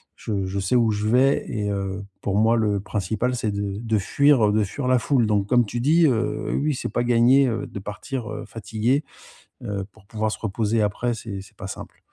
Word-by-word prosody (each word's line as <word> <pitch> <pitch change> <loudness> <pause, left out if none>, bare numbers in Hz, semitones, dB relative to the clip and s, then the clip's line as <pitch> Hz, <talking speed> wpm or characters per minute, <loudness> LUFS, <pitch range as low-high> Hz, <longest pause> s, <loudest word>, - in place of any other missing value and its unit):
je 100 -3 -3
je 100 +1 -3
sais 95 +5 0
où 115 -2 +3
je 105 +1 -1
vais 130 +5 +3
et 105 -2 -2
heu, 100 0 -3 0.2
pour 100 0 -1
moi 115 +2 +4
le 105 -3 +1
principal 110 +5 -2
c'est 110 -3 -1
de 100 0 -3
de 110 -2 0
fuir, 130 +1 +3
heu, - - +1
de 110 - +3
fuir 125 +7 -4
la 130 -1 +4
foule. 125 -1 +2
Donc 105 -2 +1
comme 120 0 +4
tu 120 +3 -4
dis, 160 +5 +4
heu, 130 +2 -1
oui - - 0
oui 150 -1 +1
c'est - - -4
pas 120 - 0
gagné, 125 +3 +5
heu, 115 - -2
de 100 - -7
partir, 105 +5 -6
heu, - - -6
fatigué, 115 +5 -1 0.6
heu, 100 -2 -3
pour 100 - -22
pouvoir 110 0 -2
se - - -5
reposer. 110 +1 0
Après 115 +4 -1
c'est 105 -3 -6
c'est - - -18
pas - - -7
simple. - - -9
110 Hz, 230 wpm, -23 LUFS, 100-125 Hz, 0.6 s, gagné